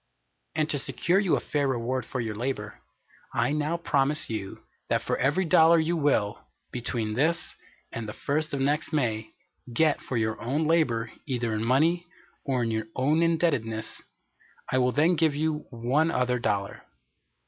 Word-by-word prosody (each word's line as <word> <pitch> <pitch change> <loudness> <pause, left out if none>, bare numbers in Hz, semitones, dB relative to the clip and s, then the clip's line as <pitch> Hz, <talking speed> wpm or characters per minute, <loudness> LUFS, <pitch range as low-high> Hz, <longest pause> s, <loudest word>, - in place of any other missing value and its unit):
And 155 -1 +1
to 145 - 0
secure 180 +7 +1
you 195 -4 +2
a - - 0
fair 145 -2 -1
reward 125 -1 -1
for 130 - -4
your 115 -2 -2
labor, 105 -2 -4 0.6
I 120 +3 +2
now 150 +3 0
promise 145 -4 +1
you 100 -3 -5 0.3
that - - +1
for - - 0
every 145 +8 +2
dollar 165 +1 +6
you 165 +2 +1
will, 140 -10 +1 0.3
between 115 -3 -2
this 160 +8 +1 0.4
and 115 -2 -5
the - - -5
first 155 +4 -1
of - - -3
next 145 +4 0
May, 115 -7 -1 0.4
get 155 +5 +2
for 125 - -3
your 110 -1 -1
own 140 +7 0
labor 120 -9 +1 0.2
either 120 -4 -1
in 110 0 -1
money 160 +9 +2 0.4
or 130 -3 0
in 115 - -1
your 110 0 -2
own 145 +5 +2
indebtedness, 145 -10 0 0.7
I 130 - +3
will 125 0 +3
then 160 +6 +3
give 160 -2 +2
you 155 0 -1
one 130 +6 +1
other 125 -5 +1
dollar. 100 -4 -2
135 Hz, 170 wpm, -27 LUFS, 115-155 Hz, 0.7 s, dollar